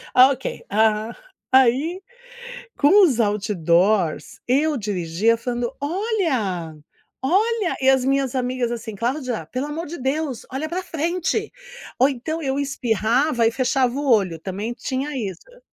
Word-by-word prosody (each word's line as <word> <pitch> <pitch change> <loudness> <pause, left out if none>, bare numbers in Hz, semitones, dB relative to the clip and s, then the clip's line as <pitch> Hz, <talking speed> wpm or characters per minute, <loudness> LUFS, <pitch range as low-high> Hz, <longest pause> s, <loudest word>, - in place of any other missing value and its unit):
Ah, 255 +2 +8
ok, 265 0 -5
ah, 215 +1 +1 0.4
aí 265 +8 +3 0.8
com 385 +8 +6
os 255 -8 +2
outdoors, 190 -4 +1
eu 295 +3 +2
dirigia 200 +2 0
falando: 240 0 -3
"Olha, 285 - -1 0.5
olha". 410 - +1
E 265 0 +5
as 265 -1 +3
minhas 275 -1 +1
amigas 250 -1 -1
assim: 230 -2 -6
"Cláudia, 245 - -2
pelo 255 +3 -2
amor 315 +3 -5
de 340 +2 -7
Deus, 270 -1 -2
olha 270 +4 -3
para 365 +3 -3
frente". 355 +7 -2 0.5
Ou 260 - +5
então 315 +5 -4
eu 270 0 -1
espirrava 245 -1 +1
e - - +4
fechava 255 0 +1
o 285 +1 -2
olho, 190 -7 +2
também 195 +7 -4
tinha 265 +4 -3
isso. 245 - -6
255 Hz, 135 wpm, -22 LUFS, 220-295 Hz, 0.8 s, Ah